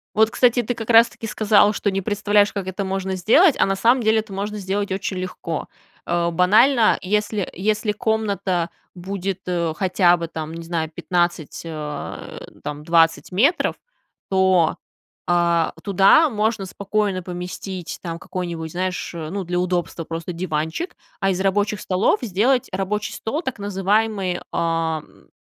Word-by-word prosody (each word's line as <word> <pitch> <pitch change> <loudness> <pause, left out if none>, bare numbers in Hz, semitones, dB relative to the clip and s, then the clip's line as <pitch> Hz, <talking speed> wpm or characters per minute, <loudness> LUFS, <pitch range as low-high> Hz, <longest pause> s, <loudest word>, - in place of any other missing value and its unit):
Вот, 220 +1 +5
кстати, 245 -1 +3
ты 245 - -1
как-раз-таки 230 0 +3
сказала, 210 -1 +4
что 200 -1 -1
не 195 0 -1
представляешь, 205 +1 +2
как 195 -2 -4
это 190 +1 -3
можно 190 0 -2
сделать, 280 - +5
а - - +5
на 195 0 0
самом 240 +5 +3
деле 220 0 +3
это 215 -2 -6
можно 205 +2 -4
сделать 200 +1 -2
очень 190 0 -3
легко. 180 -3 -4 0.4
А, 170 0 0
банально, 215 +8 +4
если 210 +1 -1
если 210 +3 0
комната 200 -5 -1 0.3
будет, 190 +1 -4
э, 170 -3 -1
хотя 180 -1 +3
бы, 170 -1 -5
там, 160 0 -6
не 165 0 -7
знаю, 165 -2 -2
15, 175 -2 -2
э, 150 -3 -6 0.2
там, 150 0 -5
20 165 +1 +3
метров, 280 - +2 0.5
то, 190 -3 +3 0.5
а, 170 -1 +2
туда 200 - +5
можно 215 -2 -1
спокойно 200 0 -1
поместить, 180 0 -6
там, 165 -2 -5
какой-нибудь, 170 -3 -5
знаешь, 180 0 -3
э, 160 -2 -5
ну, 200 -1 -3
для 175 +1 -1
удобства 175 -2 -2
просто 165 +2 -5
диванчик, 165 - -3 0.2
а 195 -1 +1
из 185 +1 -2
рабочих 205 +1 0
столов 185 +3 +1
сделать 240 +4 +1
рабочий 195 +3 -2
стол, 225 +9 -3
так 260 - -5
называемый, 200 -1 0
а, 165 -2 0
м, - - -22
190 Hz, 150 wpm, -22 LUFS, 175-210 Hz, 0.5 s, Вот